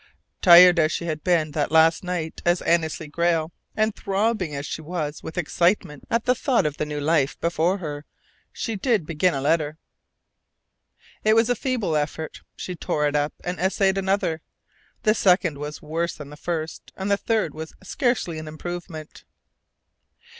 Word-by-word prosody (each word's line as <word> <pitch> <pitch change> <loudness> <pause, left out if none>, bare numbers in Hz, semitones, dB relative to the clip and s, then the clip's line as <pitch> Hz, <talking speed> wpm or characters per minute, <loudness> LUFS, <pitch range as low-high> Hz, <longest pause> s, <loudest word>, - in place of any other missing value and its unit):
Tired 175 0 +9
as 155 0 +3
she 170 - -3
had 155 -2 -3
been 165 -4 +2
that 145 0 -1
last 160 +1 +4
night 175 -3 -4
as 175 0 +2
Annesley 160 -2 0
Grayle, 165 +1 0 0.3
and 215 -1 +1
throbbing 195 -5 -1
as 140 +1 -4
she 155 - -5
was 155 -2 -4
with 160 - -8
excitement 170 -3 0
at 230 -1 0
the 250 - +4
thought 255 - +1
of 150 -1 -2
the 150 - -2
new 150 0 -4
life 145 -2 +1
before 170 +3 +1
her, 150 -5 -6 0.5
she 225 - -4
did 210 - +1
begin 165 +2 +1
a 135 - -2
letter. 150 +1 +1 1.5
It 215 0 +4
was 225 +2 +4
a - - +2
feeble 240 - -1
effort. 150 +1 -3
She 180 - -6
tore 150 -2 -1
it 145 - -2
up 145 0 0
and 180 +1 -4
essayed 190 +1 +2
another. 190 -4 0 0.6
The 215 - +4
second 180 -7 +2
was 150 +1 -6
worse 165 +3 -2
than 145 -1 -10
the - - -9
first, 160 0 -5
and 195 +1 -3
the - - +5
third 210 -7 -1
was 160 0 -8
scarcely 190 - -1
an 155 - -8
improvement. 160 0 -7
170 Hz, 170 wpm, -24 LUFS, 155-190 Hz, 1.5 s, Tired